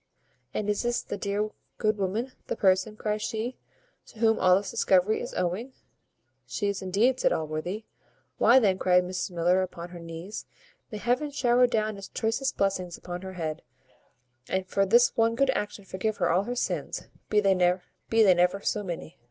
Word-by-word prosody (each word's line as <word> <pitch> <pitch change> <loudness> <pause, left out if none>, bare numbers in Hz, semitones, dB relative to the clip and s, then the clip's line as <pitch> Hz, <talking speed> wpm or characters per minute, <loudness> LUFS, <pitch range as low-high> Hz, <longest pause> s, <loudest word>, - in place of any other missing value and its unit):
"And 210 - -3
is 210 0 +1
this 240 0 0
the - - -5
dear 205 +1 -2 0.3
good 215 -2 +1
woman, 215 +7 -1 0.2
the - - -2
person," 190 +2 +2
cries 210 0 -2
she, 225 +4 -3 0.5
"to - - -16
whom 225 0 +3
all 185 -1 +6
this 195 +1 -1
discovery 190 +3 +3
is - - -6
owing?" 195 +9 -2 0.7
"She 205 - -3
is 200 -1 -3
indeed," 215 +8 +2
says - - +3
Allworthy. 160 +7 -3 0.5
"Why, 245 - +6
then," 195 -7 +3
cried 180 0 +4
Mrs 180 +2 -3
Miller, 175 +1 +2
upon 175 -2 -5
her 175 -1 -9
knees, 165 +5 -7 0.4
"may 215 - -5
Heaven 250 +7 0
shower 250 -3 +3
down 215 -3 -1
its 195 - -8
choicest 235 +4 -1
blessings 185 -3 -1
upon 175 0 -6
her 190 0 -7
head, 160 -3 -4 0.9
and 190 0 0
for 195 +1 +1
this 235 +5 +5
one 230 0 +2
good 275 +2 +3
action 205 -4 -4
forgive 205 +3 -2
her - - +2
all 185 +4 +2
her 245 +2 -3
sins, - - -2 0.3
be 210 - +4
they 195 -2 +4
never 180 0 +2 0.8
so 210 - 0
many!" 170 -3 -6
200 Hz, 175 wpm, -27 LUFS, 180-225 Hz, 0.9 s, all